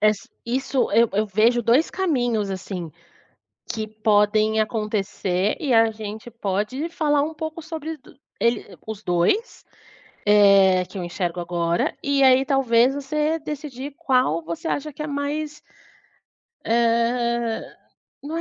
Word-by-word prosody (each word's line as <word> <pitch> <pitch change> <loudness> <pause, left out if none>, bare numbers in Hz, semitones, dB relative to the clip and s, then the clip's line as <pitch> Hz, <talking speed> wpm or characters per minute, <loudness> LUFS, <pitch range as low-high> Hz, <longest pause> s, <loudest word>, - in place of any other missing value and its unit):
Es 215 -1 +3 0.3
isso 260 +2 0
eu 235 - +4
eu 215 - -1
vejo 225 +4 +2
dois 240 +8 +3
caminhos, 245 - 0
assim, 185 -3 -5 0.8
que 220 -1 -3
podem 215 0 +2
acontecer, 210 -3 -1
e 275 -5 0
a 225 0 +5
gente 215 +1 -8
pode 220 - -2
falar 300 -4 +1
um 315 +2 -3
pouco 315 +1 -5
sobre 320 0 -6
do - - -19 0.2
ele 235 +1 +1 0.2
os 220 -1 -6
2, 180 - 0 0.6
eh, 195 -3 +6
que - - -12
eu - - -4
enxergo 175 0 -3
agora 170 -1 0 0.2
e 280 -1 +1
aí 260 +1 +5
talvez, 255 -4 +3
você 300 +3 -1
decidir 290 -2 -6
qual 250 - +2
você 170 - -4
acha 300 +1 -7
que 295 - -7
é - - -3 0.2
mais 300 +1 -4 1.1
eh, 235 0 +1 0.6
não 305 +3 -5
235 Hz, 135 wpm, -23 LUFS, 210-285 Hz, 1.1 s, eh